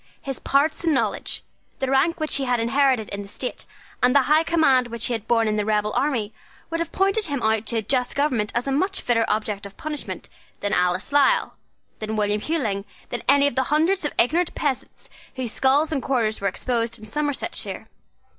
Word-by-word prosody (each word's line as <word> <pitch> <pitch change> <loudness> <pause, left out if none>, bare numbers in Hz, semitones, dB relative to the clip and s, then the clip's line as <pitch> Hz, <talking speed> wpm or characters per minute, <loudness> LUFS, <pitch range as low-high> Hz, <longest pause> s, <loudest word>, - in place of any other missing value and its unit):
His 270 -2 -5
parts 290 +5 +1
and 325 -3 +2
knowledge, - - -1 0.3
the 265 0 -2
rank 320 +6 +2
which 310 -2 +2
he 275 - -1
had 245 -1 +1
inherited 250 -1 +2
in 200 - -4
the 200 - -9
state, 250 +5 -6 0.3
and 250 +2 +4
the 280 - +6
high 305 +4 +4
command 310 -7 +3
which 235 -1 -3
he 245 - 0
had 225 -1 -4
borne 230 -2 +3
in 215 0 0
the 210 - +1
rebel 210 0 0
army, 235 -7 0 0.4
would 330 - -1
have 335 - -3
pointed 390 +2 +1
him 285 -3 -2
out 220 0 +1
to 235 - 0
a - - +1
just 250 +3 0
government 255 -8 0
as 240 - 0
a 275 - -1
much 380 +8 0
fitter 230 -2 +2
object 210 -1 -1
of 200 -1 -10
punishment 305 -2 -6 0.3
than 205 +1 -1
Alice 180 +3 +1
Lisle, 280 -2 +3 0.5
than 220 0 -3
William 210 0 0
Hewling, 225 -12 -1 0.3
than 240 - -3
any 280 0 +6
of 285 - +1
the 260 +2 +1
hundreds 325 +6 +2
of 295 - 0
ignorant 330 +8 +2
peasants 280 -4 -3 0.3
whose 255 -4 -3
skulls 285 +6 +2
and 285 -4 -1
quarters 230 -5 0
were 200 - +1
exposed 230 +3 -1
in 215 - -11
Somersetshire. 290 +5 -3
255 Hz, 205 wpm, -23 LUFS, 220-290 Hz, 0.5 s, the